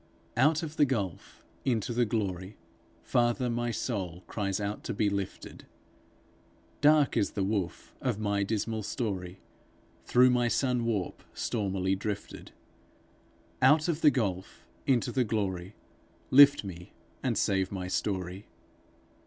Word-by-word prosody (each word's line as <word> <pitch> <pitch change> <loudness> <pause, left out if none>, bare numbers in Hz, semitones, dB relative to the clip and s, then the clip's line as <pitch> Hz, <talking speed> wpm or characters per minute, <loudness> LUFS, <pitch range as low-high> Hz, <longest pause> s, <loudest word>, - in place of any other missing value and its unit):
Out 150 +7 +3
of 160 -1 -6
the 145 - +5
gulf 105 - -4 0.2
into 120 -3 0
the 120 +1 +2
glory, 100 -3 -3 0.5
Father, 120 +1 +1
my 120 0 -1
soul 95 -7 -3
cries 100 -2 -2
out 105 +1 -3
to - - -3
be 105 -1 +1
lifted. 100 -2 -5 1.1
Dark 150 -1 +5
is 100 - +1
the 100 - -1
woof 100 -3 -3
of 125 -6 -1
my 100 -1 0
dismal 110 +2 -1
story, 95 -4 -4 0.7
Thorough 125 +1 +5
thy 120 -1 +2
sun 125 -1 +1
warp 105 -6 -2
stormily 95 -4 -1
drifted! 100 +1 -5 1.1
Out 150 +5 +5
of 165 -2 -1
the 150 - +7
gulf 100 -9 -3 0.2
into 125 -1 +2
the 130 +1 +2
glory, 100 -4 -2 0.6
Lift 140 0 +8
me, 90 -3 -9 0.3
and - - 0
save 95 -1 +1
my 95 -2 -4
story. 95 0 -3
105 Hz, 130 wpm, -29 LUFS, 95-125 Hz, 1.1 s, Lift